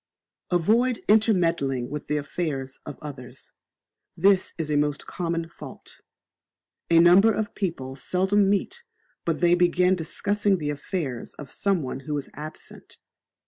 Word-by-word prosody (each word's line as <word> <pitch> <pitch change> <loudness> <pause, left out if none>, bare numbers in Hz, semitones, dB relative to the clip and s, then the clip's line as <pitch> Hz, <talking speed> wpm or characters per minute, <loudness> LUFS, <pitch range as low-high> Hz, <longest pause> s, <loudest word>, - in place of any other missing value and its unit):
Avoid 225 +8 +2
intermeddling 170 - +2
with 150 0 -5
the 150 - 0
affairs 145 -3 -3
of - - -7
others. 130 -3 -9 0.6
This 190 +2 +3
is 155 -3 -3
a - - +2
most 145 0 0
common 170 -2 -3
fault. 170 - -12 0.9
A 165 - +5
number 180 +6 +7
of 215 -1 -2
people 135 -9 -4
seldom 190 +8 +1
meet 205 - -1 0.4
but 165 0 -1
they 175 0 +5
begin 180 +1 +3
discussing 205 +4 0
the 150 -3 -2
affairs 145 -4 -4
of 140 -3 -10
some 195 -5 0
one 130 0 -4
who 145 +2 -3
is 140 - -6
absent. 155 +1 -10
170 Hz, 140 wpm, -25 LUFS, 145-190 Hz, 0.9 s, number